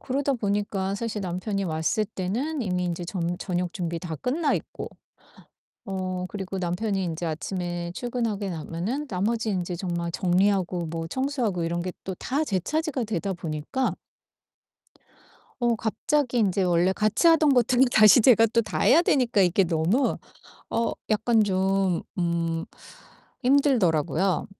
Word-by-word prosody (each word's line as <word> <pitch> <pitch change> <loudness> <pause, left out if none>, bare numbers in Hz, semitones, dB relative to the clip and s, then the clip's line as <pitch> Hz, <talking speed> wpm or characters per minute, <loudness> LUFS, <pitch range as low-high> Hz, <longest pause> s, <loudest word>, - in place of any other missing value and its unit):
그러다 275 +1 -1
보니까 200 -3 -1
사실 220 0 -3
남편이 195 +2 -2
왔을 160 +5 0
때는 225 +10 -3
이미 180 -4 -1
인제 175 0 -3
점 175 -1 -2
저녁 180 -2 -2
준비 170 -2 -3
다 165 -2 -5
끝나 280 - 0
있고 - - -5 1.0
어 185 -1 -3
그리고 195 -1 -5
남편이 190 +3 -1
인제 170 0 -3
아침에 175 +1 -3
출근하고 230 -4 -2
나면은 180 - -4
나머지 220 +3 -1
인제 180 -2 -2
정말 170 -1 -3
정리하고 185 -1 +1
뭐 165 0 -4
청소하고 250 - -1
이런 170 +1 -2
게 185 0 -4
또 190 - -4
다 275 - -2
제 200 -10 0
차지가 310 - -1
되다 200 -2 -2
보니까 165 - -2 1.7
어 240 -1 +2
갑자기 250 +4 0
인제 200 -3 +2
원래 175 +1 +3
같이 215 - +2
하던 320 -2 +5
것들이 245 +1 +4
다시 215 +3 +7
제가 225 -1 +6
또 230 +1 +2
다 220 - -4
해야 315 +7 +6
되니까 250 - +2
이게 185 +1 +4
너무 170 - +1 0.5
어 230 - 0 0.2
약간 220 +1 +3
좀 190 -2 +1 0.2
음 170 -1 -1 0.8
힘들더라고요. 195 - +2
195 Hz, 290 characters per minute, -25 LUFS, 175-235 Hz, 1.7 s, 다시